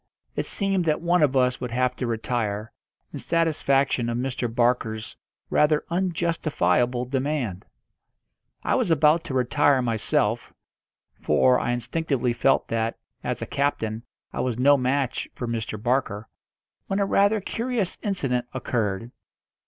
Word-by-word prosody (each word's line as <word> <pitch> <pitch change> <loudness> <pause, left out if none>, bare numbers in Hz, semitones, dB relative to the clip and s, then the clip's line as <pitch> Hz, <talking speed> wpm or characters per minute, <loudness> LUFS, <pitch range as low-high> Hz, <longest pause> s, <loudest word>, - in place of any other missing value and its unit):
It - - -1
seemed 195 -3 +1
that 155 -2 +1
one 175 +1 +2
of 140 -3 +3
us 125 -1 +2
would 125 - -3
have 125 +1 0
to 125 - -2
retire, 110 -2 -2 0.4
in - - -5
satisfaction 140 -7 +1
of 115 - -1
Mr. 125 -2 -2
Barker's 115 -2 0 0.4
rather 150 0 +3
unjustifiable 155 - +1
demand. 130 -7 -2 1.0
I - - +1
was - - +1
about 160 +1 +4
to 135 - -4
retire 135 +2 +3
myself 115 0 0 0.7
for 125 +12 +4
I - - -1
instinctively 125 +1 -1
felt 135 +3 +2
that, 115 0 -1 0.3
as - - -2
a - - -3
captain, 115 -6 -1 0.3
I - - -4
was 125 -3 -1
no 140 +3 +6
match 130 -1 -1
for 120 - -4
Mr. 110 -2 -3
Barker 120 -3 -1 0.6
when 195 - -1
a 200 - +2
rather 200 +2 +3
curious 225 -1 -2
incident 135 - -1
occurred. 115 -3 -2
130 Hz, 135 wpm, -25 LUFS, 115-155 Hz, 1.0 s, no